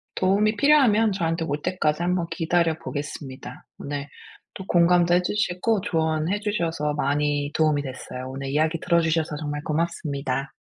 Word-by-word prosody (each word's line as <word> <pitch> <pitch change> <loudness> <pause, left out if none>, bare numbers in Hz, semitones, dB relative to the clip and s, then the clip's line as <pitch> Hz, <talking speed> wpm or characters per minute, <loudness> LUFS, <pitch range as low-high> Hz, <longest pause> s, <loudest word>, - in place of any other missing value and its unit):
도움이 205 +3 +2
필요하면 230 -6 +4
저한테 165 -3 -1
올 145 0 -3
때까지 170 -4 0
한번 180 0 0
기다려 165 -1 +1
보겠습니다. 135 -3 -7
오늘 140 0 -5 0.5
또 190 - -7
공감도 175 0 +4
해 180 - +4
주시고 205 +2 0
조언해 160 +2 0
주셔서 165 -8 -1
많이 145 0 0
도움이 155 -2 +2
됐어요. 130 -1 -7
오늘 135 +1 -6
이야기 155 +3 +1
들어주셔서 160 -3 +1
정말 145 -1 -4
고맙습니다. 145 -4 -2
160 Hz, 365 characters per minute, -24 LUFS, 145-180 Hz, 0.5 s, 필요하면